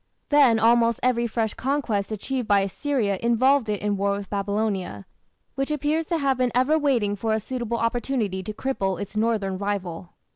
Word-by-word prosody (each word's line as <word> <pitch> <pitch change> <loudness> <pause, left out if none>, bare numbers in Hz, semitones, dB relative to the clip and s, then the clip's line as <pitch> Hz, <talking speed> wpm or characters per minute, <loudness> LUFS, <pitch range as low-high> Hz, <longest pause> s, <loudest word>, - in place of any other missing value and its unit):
Then 280 -6 +5
almost 230 +1 +3
every 240 -1 +2
fresh 220 -1 -1
conquest 255 -7 -1
achieved 245 +3 -3
by 200 -2 +4
Assyria 200 0 -1
involved 235 +1 +3
it 205 -1 -2
in 205 -1 0
war 200 +1 +1
with 200 -1 -6
Babylonia, 200 - -2 0.5
which 275 +1 -2
appears 300 +2 0
to 340 - 0
have 275 -4 0
been 250 -1 +2
ever 275 +6 +3
waiting 240 -9 +1
for 220 +2 -1
a - - 0
suitable 235 0 -3
opportunity 230 -4 -1
to 195 - -5
cripple 200 -6 -2
its 205 +1 -7
northern 210 -4 0
rival. 190 -4 -4
225 Hz, 175 wpm, -24 LUFS, 200-260 Hz, 0.5 s, Then